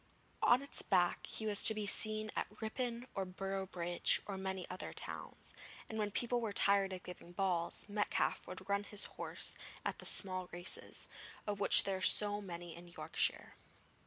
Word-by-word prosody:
On 245 Hz, +3 st, +5 dB
its 280 Hz, -, +3 dB
back 180 Hz, -3 st, +2 dB
he 220 Hz, -, -4 dB
was 210 Hz, -2 st, +4 dB
to 220 Hz, -, +9 dB
be 210 Hz, -1 st, -2 dB
seen 215 Hz, +1 st, +1 dB
at -, -, -1 dB
Ripon 235 Hz, +2 st, -3 dB
or 195 Hz, -, -1 dB
Boroughbridge 185 Hz, -2 st, 0 dB
or 200 Hz, -, -4 dB
many 190 Hz, -1 st, -4 dB
other 185 Hz, +1 st, -5 dB
towns, -, -, -7 dB, 0.3 s
and 220 Hz, -, -5 dB
when 210 Hz, -1 st, 0 dB
people 240 Hz, +3 st, 0 dB
were 225 Hz, -2 st, -2 dB
tired 200 Hz, -1 st, +3 dB
of 185 Hz, -1 st, -6 dB
giving 175 Hz, -1 st, -10 dB
balls, 175 Hz, -2 st, -1 dB
Metcalfe 205 Hz, 0 st, 0 dB
would 185 Hz, +1 st, -7 dB
run 200 Hz, 0 st, +1 dB
his 205 Hz, 0 st, 0 dB
horse -, -, -4 dB, 0.3 s
at -, -, -2 dB
the -, -, -7 dB
small 185 Hz, -2 st, -1 dB
races, 175 Hz, +1 st, -2 dB, 0.4 s
of 205 Hz, -1 st, -2 dB
which 200 Hz, -, +6 dB
there 195 Hz, -1 st, -1 dB
are -, -, -8 dB
so 205 Hz, +2 st, +6 dB
many 175 Hz, -3 st, -7 dB
in 175 Hz, +1 st, -11 dB
Yorkshire. 170 Hz, -, -1 dB
195 Hz, 175 wpm, -36 LUFS, 185-210 Hz, 0.4 s, to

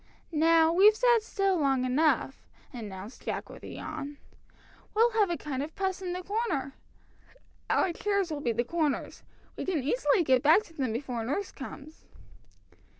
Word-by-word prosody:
"Now 325 Hz, +1 st, +4 dB
we've 410 Hz, +4 st, +6 dB
sat 480 Hz, 0 st, +4 dB
still 390 Hz, -4 st, 0 dB
long 270 Hz, -3 st, +2 dB
enough," 270 Hz, 0 st, +1 dB, 0.3 s
announced 210 Hz, -2 st, -8 dB
Jack -, -, -4 dB
with -, -, -12 dB
a -, -, -9 dB
yawn. 285 Hz, +1 st, -6 dB, 0.8 s
"We'll 460 Hz, +2 st, +4 dB
have 425 Hz, -3 st, +2 dB
a 345 Hz, -, -1 dB
kind 275 Hz, -3 st, -4 dB
of 305 Hz, +3 st, -6 dB
'Puss 380 Hz, -1 st, -2 dB
in 360 Hz, -1 st, -3 dB
the 365 Hz, 0 st, -5 dB
Corner.' 390 Hz, -, -2 dB, 1.0 s
Our 355 Hz, -, +2 dB
chairs 400 Hz, -2 st, -1 dB
will 295 Hz, -2 st, -3 dB
be 240 Hz, -, 0 dB
the 235 Hz, +1 st, 0 dB
corners. 310 Hz, 0 st, -2 dB, 0.3 s
We -, -, -4 dB
can 340 Hz, -8 st, -1 dB
easily 435 Hz, -, +2 dB
get 260 Hz, -4 st, +3 dB
back 320 Hz, +9 st, +5 dB
to 335 Hz, -, -18 dB
them 265 Hz, -7 st, -2 dB
before 240 Hz, -1 st, -3 dB
nurse 290 Hz, -, -2 dB
comes." 295 Hz, +3 st, -10 dB
320 Hz, 165 wpm, -29 LUFS, 270-385 Hz, 1.0 s, we've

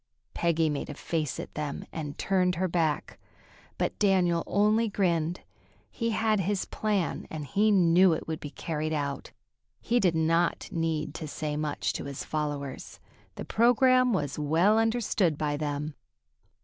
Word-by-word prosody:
Peggy 165 Hz, -1 st, +1 dB
made 145 Hz, -2 st, -3 dB
a 150 Hz, -, -6 dB
face 155 Hz, -2 st, -2 dB
at -, -, -7 dB
them 150 Hz, -2 st, -4 dB
and 150 Hz, -3 st, -5 dB
turned 185 Hz, -2 st, +1 dB
her 185 Hz, +2 st, 0 dB
back, 165 Hz, -3 st, -1 dB, 0.6 s
but -, -, -2 dB
Daniel 180 Hz, -4 st, +3 dB
only 215 Hz, +3 st, +2 dB
grinned. 175 Hz, -4 st, 0 dB, 0.5 s
He 230 Hz, -1 st, -2 dB
had 220 Hz, -1 st, +1 dB
his 195 Hz, +1 st, -1 dB
plan, 205 Hz, -5 st, -2 dB
and 155 Hz, -2 st, -5 dB
he 205 Hz, +10 st, +2 dB
knew 180 Hz, -2 st, +5 dB
it 160 Hz, -, -4 dB
would 160 Hz, -1 st, -3 dB
be 145 Hz, -, -7 dB
carried 155 Hz, +1 st, -3 dB
out. 140 Hz, -2 st, -3 dB, 0.5 s
He 240 Hz, +2 st, +1 dB
did 180 Hz, -6 st, +2 dB
not 165 Hz, +2 st, +1 dB
need 160 Hz, -2 st, -1 dB
to 155 Hz, -, -6 dB
say 150 Hz, 0 st, -3 dB
much 150 Hz, -1 st, -2 dB
to -, -, -5 dB
his 140 Hz, -1 st, -5 dB
followers. 145 Hz, -3 st, -4 dB, 0.4 s
The -, -, -6 dB
program 250 Hz, +2 st, +4 dB
was 145 Hz, -, -1 dB
well 170 Hz, +9 st, +3 dB
understood 225 Hz, -8 st, +1 dB
by 150 Hz, -1 st, -1 dB
them. 145 Hz, 0 st, -3 dB
165 Hz, 155 wpm, -28 LUFS, 150-200 Hz, 0.6 s, knew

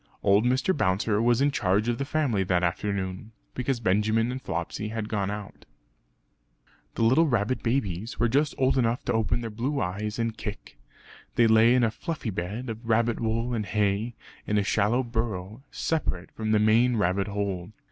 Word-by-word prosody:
Old 100 Hz, +3 st, +4 dB
Mr. 130 Hz, +9 st, +2 dB
Bouncer 105 Hz, -2 st, +1 dB
was 120 Hz, +2 st, +3 dB
in 145 Hz, +1 st, +3 dB
charge 105 Hz, -3 st, +1 dB
of 120 Hz, -1 st, 0 dB
the 140 Hz, -, -1 dB
family 140 Hz, -9 st, 0 dB
that 90 Hz, -1 st, +1 dB
afternoon, 95 Hz, +3 st, -2 dB, 0.2 s
because 125 Hz, 0 st, -1 dB
Benjamin 110 Hz, +3 st, +1 dB
and 130 Hz, +1 st, -5 dB
Flopsy 85 Hz, +4 st, -4 dB
had 110 Hz, 0 st, -4 dB
gone 100 Hz, -3 st, -1 dB
out. 105 Hz, -1 st, -7 dB, 1.3 s
The -, -, 0 dB
little 130 Hz, +9 st, +4 dB
rabbit 120 Hz, -1 st, 0 dB
babies 115 Hz, -4 st, -2 dB
were 120 Hz, -, +3 dB
just 140 Hz, +5 st, +1 dB
old 130 Hz, 0 st, +2 dB
enough 115 Hz, 0 st, 0 dB
to -, -, 0 dB
open 115 Hz, +1 st, 0 dB
their 115 Hz, -1 st, -5 dB
blue 130 Hz, +7 st, -2 dB
eyes 105 Hz, +4 st, -3 dB
and 115 Hz, -1 st, -1 dB
kick. 105 Hz, -, -8 dB, 0.6 s
They 120 Hz, -, +5 dB
lay 110 Hz, +2 st, +5 dB
in 125 Hz, -, +3 dB
a 110 Hz, -, +2 dB
fluffy 155 Hz, -3 st, -4 dB
bed 100 Hz, +8 st, -4 dB
of 115 Hz, +1 st, -6 dB
rabbit 115 Hz, +1 st, +2 dB
wool 115 Hz, +2 st, -1 dB
and 110 Hz, -3 st, -1 dB
hay, 105 Hz, +3 st, 0 dB, 0.3 s
in 105 Hz, -, +1 dB
a 105 Hz, -, +2 dB
shallow 110 Hz, +6 st, +1 dB
burrow, 110 Hz, -2 st, -3 dB
separate 140 Hz, -, -2 dB
from 110 Hz, -1 st, -4 dB
the 110 Hz, -, +4 dB
main 115 Hz, +4 st, +4 dB
rabbit 95 Hz, 0 st, +1 dB
hole. 100 Hz, -2 st, -3 dB
110 Hz, 180 wpm, -27 LUFS, 100-120 Hz, 1.3 s, They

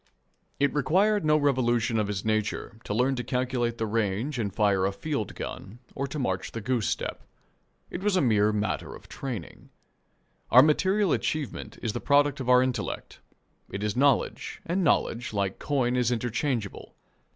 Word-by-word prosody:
It 140 Hz, 0 st, +2 dB
required 190 Hz, +9 st, +2 dB
no 155 Hz, 0 st, +4 dB
revolution 120 Hz, -5 st, +1 dB
of 105 Hz, -, 0 dB
his 100 Hz, -1 st, -3 dB
nature 110 Hz, 0 st, -2 dB
to -, -, -2 dB
learn 130 Hz, +4 st, +2 dB
to 125 Hz, -, -2 dB
calculate 125 Hz, -1 st, -1 dB
the 115 Hz, -, -1 dB
range 110 Hz, +5 st, -1 dB
and 105 Hz, -3 st, -1 dB
fire 100 Hz, -2 st, +2 dB
a -, -, -1 dB
field 125 Hz, 0 st, -4 dB
gun 100 Hz, +5 st, -7 dB, 0.2 s
or 140 Hz, +1 st, -3 dB
to 145 Hz, -, -6 dB
march 95 Hz, -9 st, -2 dB
the 115 Hz, -, -3 dB
goose 115 Hz, 0 st, -1 dB
step. -, -, -3 dB, 0.7 s
It 175 Hz, -, -5 dB
was 205 Hz, -1 st, +1 dB
a -, -, +4 dB
mere 105 Hz, -4 st, +3 dB
matter 105 Hz, 0 st, -2 dB
of -, -, -14 dB
training. 120 Hz, -, -7 dB, 0.8 s
Our 125 Hz, +2 st, +8 dB
material 190 Hz, +5 st, +2 dB
achievement 155 Hz, -3 st, -3 dB
is 110 Hz, -3 st, -1 dB
the 120 Hz, -, -4 dB
product 145 Hz, 0 st, +3 dB
of 130 Hz, -2 st, -3 dB
our 125 Hz, 0 st, +6 dB
intellect. 130 Hz, -1 st, -4 dB, 0.5 s
It 100 Hz, -, -5 dB
is 105 Hz, -1 st, -1 dB
knowledge, 135 Hz, 0 st, +1 dB
and 180 Hz, +3 st, 0 dB
knowledge, 120 Hz, -7 st, +1 dB
like 100 Hz, -2 st, -1 dB
coin, 130 Hz, -4 st, 0 dB
is 125 Hz, -2 st, +2 dB
interchangeable. 120 Hz, -2 st, -2 dB
125 Hz, 170 wpm, -27 LUFS, 110-140 Hz, 0.8 s, Our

